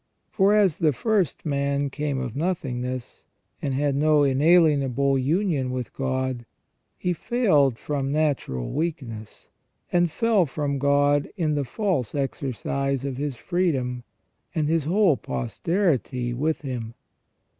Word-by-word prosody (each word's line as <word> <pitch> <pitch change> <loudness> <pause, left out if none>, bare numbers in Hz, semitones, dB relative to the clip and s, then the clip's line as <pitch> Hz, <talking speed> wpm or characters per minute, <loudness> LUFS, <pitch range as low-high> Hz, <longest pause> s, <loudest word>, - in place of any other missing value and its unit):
For 200 +1 +4
as 195 -7 +3
the 155 -3 +3
first 200 - 0
man 140 -1 0
came 145 -1 -2
of 125 -4 -4
nothingness, 130 -7 -3 0.3
and 135 -2 -1
had 140 0 +1
no 150 +1 +4
inaHenable 140 -2 +3
union 155 -3 +1
with 125 -2 -4
God, 130 -3 -2 0.5
he 180 - -1
failed 155 - +2
from 140 -1 -2
natural 140 - -1
weakness, 130 -9 -5 0.4
and 175 -1 +3
fell 215 -1 +2
from 140 0 -2
God 145 +1 +2
in 160 -4 +1
the 145 -1 0
false 150 - -1
exercise 135 0 -2
of 135 -2 -3
his 145 -1 -3
freedom, 130 -7 -1 0.5
and 155 -2 +1
his 160 -2 +1
whole 180 -3 +3
posterity 125 - -1
with 155 +6 -1
him. 120 -5 -5
140 Hz, 125 wpm, -25 LUFS, 130-165 Hz, 0.5 s, For